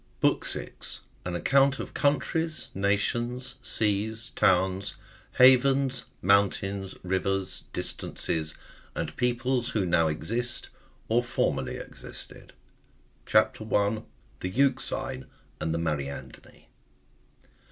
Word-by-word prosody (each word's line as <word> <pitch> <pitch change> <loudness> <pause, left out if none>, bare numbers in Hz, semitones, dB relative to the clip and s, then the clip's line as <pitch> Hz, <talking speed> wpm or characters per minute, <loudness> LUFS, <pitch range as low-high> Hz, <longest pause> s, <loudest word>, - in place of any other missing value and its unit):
AN 90 -1 -2
ACCOUNT 135 +8 +4
OF - - -6
COUNTRIES, 155 +2 +1
NATIONS, 120 +6 0
SEAS, 110 0 0
TOWNS, 95 +2 +2 0.4
HAVENS, 130 0 +5 0.2
MOUNTAINS, 100 0 +2
RIVERS, 95 0 -1
DISTANCES, 80 -1 -3 0.4
AND - - -3
PEOPLES 125 0 +1
WHO 105 -6 0
NOW 85 -2 +3
EXIST, 115 +11 -2 0.4
OR 115 +2 +3
FORMERLY 125 +2 -1
EXISTED. - - -10 0.7
CHAP. 110 0 +4
1. 105 -1 +1
(1.) 110 - -10 0.3
THE 90 - -3
EUXINE 130 - 0 0.3
AXD 80 - 0
THE 85 - 0
MAETA:ffDINI. 75 -4 -4
105 Hz, 90 wpm, -28 LUFS, 95-125 Hz, 0.7 s, HAVENS